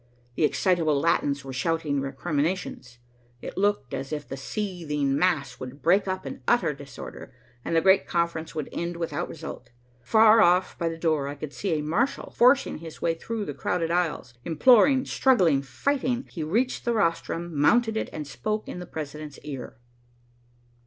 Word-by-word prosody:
The 150 - +2
excitable 155 +1 +2
Latins 140 -3 +1
were 135 - -6
shouting 150 0 0
recriminations. 145 -1 -3 0.4
It - - -7
looked 200 -9 0
as 135 +2 -4
if 150 -1 -4
the - - -5
seething 150 -4 -2
mass 145 -7 0
would 130 +2 -8
break 190 +4 +4
up 185 -3 -3
in 135 - -7
utter 240 -11 +3
disorder, 140 -3 -10 0.3
and - - -2
the 165 - +4
great 190 +2 +4
conference 170 -2 -1
would 155 -3 -3
end 170 0 -3
without 170 +1 -3
result. 160 0 -8 0.3
Far 220 - +6
off 180 0 +3
by 170 -1 0
the 165 - -6
door, 155 -4 0
I 145 - -5
could 145 0 -7
see 195 -4 -2
a 150 - -3
marshal 215 - -1
forcing 255 - +3
his 165 -1 -10
way 165 - +1
through 215 +6 -4
the 145 - -4
crowded 165 +4 -1
aisles, 170 -7 -1
imploring, 255 - +5
struggling, 180 - +3
fighting. 250 - -1
He 165 - -6
reached 230 +12 0
the 240 - +1
rostrum, 170 -3 -1
mounted 225 +10 +3
it, 220 - -2
and 150 - -5
spoke 210 - -3
in - - -6
the 180 - -8
president's 150 -2 -7
ear. 135 -6 -7
165 Hz, 170 wpm, -26 LUFS, 145-190 Hz, 0.4 s, Far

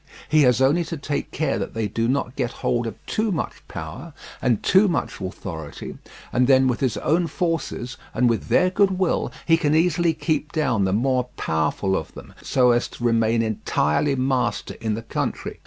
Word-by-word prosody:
He 155 -1 +5
has 125 -3 +4
only 145 +6 +4
to 165 0 -5
take 145 0 -3
care - - -1
that - - -5
they 110 -2 -1
do 115 +3 -1
not 130 0 -1
get 125 -3 -1
hold 120 -1 +1
of 115 - -5
too 215 0 0
much 170 - -3
power 80 - -7 0.3
and 120 -4 +1
too 190 +3 +5
much 170 - -2
authority, 85 -5 -6 0.4
and 125 +1 +3
then 130 -1 +5
with 125 -2 0
his 125 -6 0
own 165 +7 +1
forces, 165 -8 -3
and 125 +1 +2
with 115 -2 0
their 180 0 +3
goodwill, 190 -2 +1
he 165 -1 +5
can 155 -2 +1
easily 170 0 +2
keep 155 -2 -1
down 125 - +1
the 95 - 0
more 125 +4 +1
powerful 80 +5 0
of 80 - -4
them, - - -11
so 125 -2 +3
as 120 +1 +1
to - - -11
remain 115 -1 +2
entirely 110 - 0
master 130 -1 -1
in 110 -2 -1
the 115 - -6
country. 115 - -4
125 Hz, 190 wpm, -23 LUFS, 115-160 Hz, 0.4 s, He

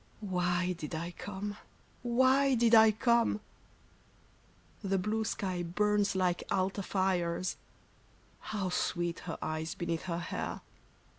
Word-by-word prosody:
— - - -30
Why 180 -2 0
did 160 -2 -6
I 170 +2 -3
come? 205 +3 -6 0.4
Why 260 +3 +4
did 235 -1 +3
I 220 -1 +9
come? 235 0 +2 1.4
The 195 0 +1
blue 215 +4 0
sky 185 -4 -2
burns 205 +4 +1
like 180 -2 +1
altar 190 +1 0
fires 185 -2 0 0.5
— - - -32
How 200 -3 -1
sweet 175 -1 -1
her - - -3
eyes 155 +1 -3
beneath 170 0 -3
her 170 -2 -2
hair 170 - -4
190 Hz, 130 wpm, -32 LUFS, 175-215 Hz, 1.4 s, I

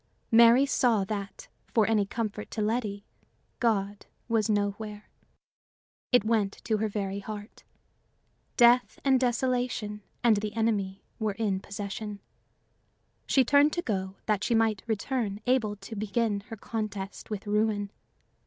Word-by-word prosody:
Mary 235 +3 +7
saw 240 -7 +2
that, 200 0 -5 0.3
for 220 -2 +5
any 215 -3 +2
comfort 215 -1 -4
to - - -6
Letty, 210 -2 -1 0.5
God 205 -4 0 0.2
was 225 -2 +1
nowhere. 210 0 -2 1.0
It 245 -4 +5
went 215 -3 +1
to 220 - +1
her 220 +1 0
very 200 -1 -3
heart. 210 +1 -8 0.9
Death 245 0 +5
and 265 -1 +5
desolation 245 -4 -1 0.2
and 230 -3 +5
the 210 +1 -3
enemy 205 -4 0 0.2
were 215 -2 0
in 200 -3 -1
possession. 200 +1 -6 1.1
She 265 -2 +4
turned 285 +3 +5
to 345 - -2
go, 190 -3 -2
that 210 -2 +1
she 235 - +1
might 220 -3 +2
return 220 -1 -1
able 245 -5 +2
to 205 +2 -9
begin 215 0 0
her 225 - -7
contest 205 -3 -5
with 210 -2 -5
ruin. 210 -1 0
215 Hz, 135 wpm, -28 LUFS, 205-230 Hz, 1.1 s, Mary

